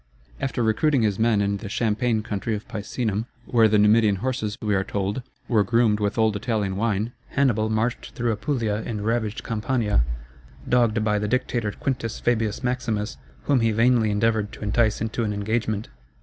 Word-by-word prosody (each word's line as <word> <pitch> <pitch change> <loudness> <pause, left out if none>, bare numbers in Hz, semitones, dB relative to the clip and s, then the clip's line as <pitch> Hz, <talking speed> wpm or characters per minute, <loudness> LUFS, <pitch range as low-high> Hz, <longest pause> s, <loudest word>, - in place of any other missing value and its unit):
After 135 -3 -1
recruiting 120 +4 +2
his 105 -2 0
men 110 -2 +3
in 100 0 0
the 105 0 -7
champaign 110 +1 0
country 105 +1 -2
of 105 - -7
Picenum, 110 +1 -3 0.2
where 115 -2 +4
the 105 0 +3
Numidian 105 0 +5
horses, 110 -1 -2
we 105 -1 -1
are 95 -1 +2
told, 100 +4 -2 0.3
were 110 -4 +3
groomed 115 -2 +2
with 105 +1 -1
old 110 -2 +3
Italian 105 -3 -1
wine, 110 +1 0 0.2
Hannibal 115 -6 +1
marched 110 +3 -2
through 120 -3 0
Apulia 110 -2 -1
and 105 -3 -4
ravaged 110 -2 -1
Campania, 115 - 0 0.6
dogged 115 -3 +2
by 105 -1 +1
the 105 - -1
dictator 120 -2 0
Quintus 130 -4 -3
Fabius 115 -1 0
Maximus, 125 -4 -2 0.3
whom 140 -3 +3
he 115 -1 +2
vainly 115 0 +3
endeavored 105 0 +1
to - - -9
entice 110 +1 +1
into 115 +1 -1
an 105 -2 -1
engagement. 110 +1 -2
110 Hz, 170 wpm, -24 LUFS, 105-120 Hz, 0.6 s, Numidian